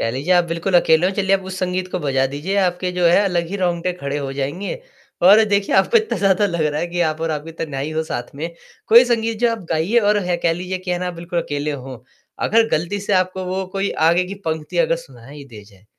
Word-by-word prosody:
कह 115 Hz, -, 0 dB
लीजिए 140 Hz, +9 st, -1 dB
आप 175 Hz, -, +4 dB
बिल्कुल 170 Hz, +2 st, -3 dB
अकेले 170 Hz, 0 st, +4 dB
हो, 190 Hz, -, 0 dB
चलिए 195 Hz, -1 st, +2 dB
आप 190 Hz, -, -11 dB
उस 190 Hz, -, -6 dB
संगीत 185 Hz, 0 st, -2 dB
को -, -, -1 dB
बजा 135 Hz, -4 st, +1 dB
दीजिए, 175 Hz, +8 st, -3 dB
आपके 180 Hz, -1 st, 0 dB
जो 180 Hz, 0 st, -1 dB
है 175 Hz, +4 st, +5 dB
अलग 175 Hz, -3 st, 0 dB
ही 200 Hz, -, -4 dB
रोंगटे 180 Hz, -1 st, -1 dB
खड़े 140 Hz, +1 st, -3 dB
हो 135 Hz, -2 st, -4 dB
जाएँगे 145 Hz, +8 st, -3 dB, 0.5 s
और 205 Hz, +5 st, +7 dB
देखिए 200 Hz, -1 st, +1 dB
आपको 475 Hz, -, +4 dB
इतना 440 Hz, -1 st, 0 dB
ज़्यादा 195 Hz, +1 st, +3 dB
लग 170 Hz, -4 st, -2 dB
रहा 150 Hz, 0 st, -2 dB
है -, -, -1 dB
कि 175 Hz, 0 st, -4 dB
आप 155 Hz, +1 st, -7 dB
और 165 Hz, -, -1 dB
आपकी 155 Hz, +1 st, -5 dB
तन्हाई 140 Hz, -1 st, -4 dB
हो 160 Hz, 0 st, -1 dB
साथ 120 Hz, -4 st, -6 dB
में, 160 Hz, +4 st, -4 dB, 0.4 s
कोई 235 Hz, +3 st, +8 dB
संगीत 230 Hz, -2 st, -1 dB
जो 240 Hz, -1 st, +3 dB
आप 230 Hz, -, -4 dB
गाइए 165 Hz, +9 st, +2 dB
और 210 Hz, -2 st, +3 dB
है 180 Hz, -1 st, 0 dB
कह 170 Hz, -1 st, +1 dB
लीजिए 180 Hz, +2 st, -4 dB
कि 185 Hz, 0 st, -6 dB
है 175 Hz, -, 0 dB
ना 180 Hz, 0 st, -3 dB
बिल्कुल 170 Hz, 0 st, -4 dB
अकेले 145 Hz, +1 st, -3 dB
हों। 130 Hz, -2 st, -8 dB, 0.5 s
अगर 225 Hz, +1 st, +3 dB
गलती 170 Hz, +6 st, 0 dB
से 205 Hz, +1 st, -3 dB
आपको 185 Hz, 0 st, 0 dB
वो 190 Hz, +1 st, -2 dB
कोई 195 Hz, 0 st, -1 dB, 0.2 s
आगे 175 Hz, +2 st, +3 dB
की 195 Hz, +2 st, -7 dB
पंक्ति 160 Hz, -, -3 dB
अगर -, -, +2 dB
सुनाई 145 Hz, -, -12 dB
दे 105 Hz, -3 st, -11 dB
जाए, 100 Hz, -1 st, -21 dB
180 Hz, 250 wpm, -20 LUFS, 155-195 Hz, 0.5 s, कोई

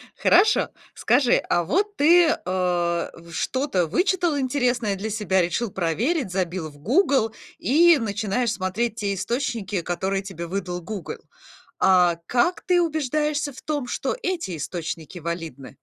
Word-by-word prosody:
Хорошо, 390 Hz, +6 st, +4 dB, 0.3 s
скажи, 265 Hz, -4 st, +3 dB, 0.2 s
а 175 Hz, -, +2 dB
вот 405 Hz, -, 0 dB
ты, 340 Hz, +4 st, +6 dB
э, -, -, +3 dB
в 175 Hz, -2 st, -1 dB
что-то 255 Hz, -, 0 dB
вычитал 345 Hz, -, +1 dB
интересное 250 Hz, -5 st, 0 dB
для 210 Hz, +3 st, -4 dB
себя, 200 Hz, -3 st, +1 dB
решил 180 Hz, +7 st, -1 dB
проверить, 200 Hz, -, -1 dB
забил 180 Hz, -3 st, -2 dB
в 145 Hz, -, -18 dB
Гугл 260 Hz, -, +2 dB, 0.3 s
и 335 Hz, +5 st, +5 dB
начинаешь 215 Hz, +2 st, -1 dB
смотреть 210 Hz, +4 st, -2 dB
те 205 Hz, -2 st, -2 dB
источники, 210 Hz, -3 st, -2 dB
которые 190 Hz, +3 st, -2 dB
тебе 170 Hz, -3 st, -7 dB
выдал 180 Hz, -1 st, -4 dB
Гугл. 205 Hz, 0 st, -6 dB, 0.6 s
А 180 Hz, -3 st, +4 dB
как 250 Hz, -, +1 dB
ты 355 Hz, -1 st, +3 dB
убеждаешься 300 Hz, -1 st, -1 dB
в -, -, -12 dB
том, 290 Hz, -5 st, -3 dB
что -, -, -2 dB
эти 335 Hz, -, -2 dB
источники 165 Hz, +2 st, -5 dB
валидны? 160 Hz, -6 st, -6 dB
210 Hz, 135 wpm, -24 LUFS, 180-285 Hz, 0.6 s, ты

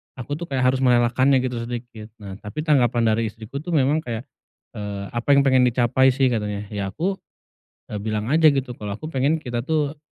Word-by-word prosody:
aku 145 Hz, +4 st, -5 dB
tuh 170 Hz, -, -5 dB
kayak 135 Hz, -3 st, -1 dB
harus 130 Hz, -, -2 dB
merelakannya 130 Hz, +1 st, +3 dB
gitu 125 Hz, -2 st, -2 dB
sedikit. 120 Hz, -3 st, -7 dB, 0.2 s
Nah, 95 Hz, 0 st, -8 dB
tapi 110 Hz, +9 st, -6 dB
tanggapan 125 Hz, -6 st, +2 dB
dari 115 Hz, +1 st, 0 dB
istriku 110 Hz, +5 st, -7 dB
tuh 165 Hz, +3 st, -3 dB
memang 145 Hz, +2 st, +3 dB
kayak, 120 Hz, -6 st, -5 dB, 0.5 s
eee, 105 Hz, -3 st, -5 dB
"Apa 120 Hz, +4 st, +2 dB
yang 140 Hz, -, +5 dB
pengen 130 Hz, -2 st, +4 dB
dicapai 125 Hz, +2 st, +3 dB
sih?" 135 Hz, -2 st, +2 dB
katanya. 105 Hz, -3 st, -2 dB
Ya 100 Hz, -2 st, -3 dB
aku, 180 Hz, -, -2 dB, 0.7 s
eee, 105 Hz, -, -3 dB
bilang 110 Hz, +2 st, -3 dB
aja 160 Hz, +2 st, +4 dB
gitu. 135 Hz, -2 st, -2 dB
Kalau 105 Hz, -1 st, -5 dB
aku 155 Hz, +10 st, -7 dB
pengen 145 Hz, +3 st, 0 dB
kita 120 Hz, -1 st, -4 dB
tuh 150 Hz, -1 st, -1 dB
125 Hz, 195 wpm, -22 LUFS, 110-140 Hz, 0.7 s, yang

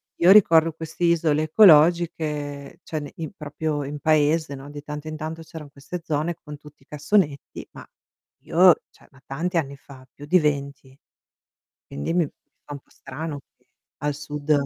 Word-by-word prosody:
io 175 Hz, +2 st, +5 dB
ricordo 165 Hz, -5 st, +6 dB
queste 160 Hz, +2 st, -4 dB
isole 160 Hz, -3 st, +2 dB
ecologiche, 155 Hz, -4 st, +3 dB
cioè 155 Hz, -, -4 dB
ne 145 Hz, -1 st, -9 dB
i 160 Hz, -2 st, -6 dB
proprio 150 Hz, -1 st, -4 dB
in 145 Hz, +1 st, -6 dB
paese, 155 Hz, 0 st, +1 dB
no, 135 Hz, +1 st, -11 dB
di 145 Hz, 0 st, -9 dB
tanto 150 Hz, +1 st, -7 dB
in 155 Hz, -, -5 dB
tanto 160 Hz, +1 st, -6 dB
c'eran 155 Hz, -3 st, -11 dB
queste 145 Hz, +6 st, -8 dB
zone 155 Hz, +2 st, -2 dB
con 150 Hz, -1 st, -9 dB
tutti 150 Hz, -1 st, -17 dB
i -, -, -30 dB
cassonetti, 150 Hz, -1 st, -1 dB
ma -, -, -12 dB, 0.6 s
io 180 Hz, +1 st, +5 dB
cioè -, -, -23 dB
ma 135 Hz, -1 st, -21 dB
tanti 170 Hz, +7 st, -4 dB
anni 140 Hz, -3 st, -2 dB
fa, 135 Hz, -1 st, -15 dB
più 145 Hz, -, -11 dB
di 180 Hz, +5 st, +4 dB
20. 140 Hz, -3 st, -3 dB, 0.9 s
Quindi 70 Hz, -, -4 dB
mi 170 Hz, -4 st, +1 dB, 0.4 s
fa 145 Hz, -, -8 dB
un -, -, -7 dB
po' -, -, -37 dB
strano 150 Hz, +2 st, -7 dB, 0.6 s
al 150 Hz, -1 st, -2 dB
sud 150 Hz, +1 st, -3 dB
150 Hz, 170 wpm, -23 LUFS, 145-165 Hz, 0.9 s, ricordo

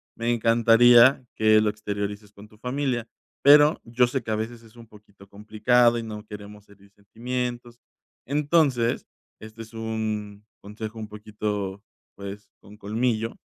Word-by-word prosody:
me 115 Hz, +1 st, -1 dB
encantaría 120 Hz, +3 st, +5 dB
que 110 Hz, 0 st, +4 dB
lo 110 Hz, -, +1 dB
exteriorices 105 Hz, 0 st, -5 dB
con 100 Hz, +1 st, -14 dB
tu 110 Hz, -, -21 dB
familia. 125 Hz, -1 st, -3 dB, 0.4 s
Pero 145 Hz, +2 st, +6 dB
yo 120 Hz, +1 st, +2 dB
sé 125 Hz, +1 st, -3 dB
que 110 Hz, -, -5 dB
a -, -, +1 dB
veces 115 Hz, +2 st, -5 dB
es 110 Hz, 0 st, -19 dB
un 115 Hz, -1 st, -14 dB
poquito 105 Hz, -2 st, -19 dB
complicado 115 Hz, +4 st, +2 dB
y -, -, -5 dB
no 105 Hz, -1 st, -8 dB
queremos 105 Hz, -1 st, -11 dB
herir 100 Hz, 0 st, -21 dB
sentimientos. 120 Hz, +3 st, -6 dB, 0.5 s
Entonces, 140 Hz, -4 st, +1 dB, 0.3 s
este 110 Hz, +1 st, -10 dB
es 110 Hz, -, -17 dB
un 110 Hz, -2 st, -5 dB, 0.2 s
consejo 110 Hz, +2 st, -8 dB
un 110 Hz, -, -6 dB
poquito, 105 Hz, -2 st, -5 dB, 0.3 s
pues, 100 Hz, +1 st, -9 dB
con 105 Hz, +1 st, -16 dB
colmillo, 115 Hz, +2 st, -2 dB
110 Hz, 145 wpm, -24 LUFS, 105-120 Hz, 0.5 s, Pero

